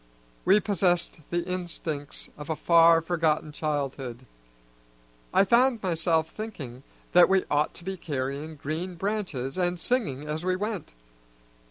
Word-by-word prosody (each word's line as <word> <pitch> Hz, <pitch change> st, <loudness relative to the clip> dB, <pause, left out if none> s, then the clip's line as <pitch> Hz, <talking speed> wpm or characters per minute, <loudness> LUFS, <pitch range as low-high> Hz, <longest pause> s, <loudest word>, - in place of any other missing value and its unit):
We 195 Hz, +3 st, +6 dB
possessed 180 Hz, -5 st, +1 dB
the 175 Hz, 0 st, -1 dB
instincts 165 Hz, -5 st, -4 dB
of 150 Hz, +1 st, -9 dB
a 160 Hz, -, 0 dB
far, 165 Hz, 0 st, +5 dB
forgotten 160 Hz, -3 st, +1 dB
childhood; 135 Hz, -5 st, -3 dB, 1.1 s
I -, -, +5 dB
found 235 Hz, +2 st, +3 dB
myself 165 Hz, -2 st, +1 dB
thinking 145 Hz, -, -7 dB, 0.3 s
that 175 Hz, +1 st, +7 dB
we 190 Hz, -1 st, +3 dB
ought 145 Hz, +1 st, +1 dB
to 175 Hz, -, -9 dB
be 190 Hz, +1 st, -4 dB
carrying 145 Hz, -1 st, -4 dB
green 160 Hz, +5 st, -4 dB
branches 180 Hz, -8 st, -3 dB
and 175 Hz, -1 st, 0 dB
singing 170 Hz, -, 0 dB
as 155 Hz, +2 st, -3 dB
we 185 Hz, 0 st, +1 dB
went. 205 Hz, -, -4 dB
165 Hz, 135 wpm, -27 LUFS, 150-185 Hz, 1.1 s, that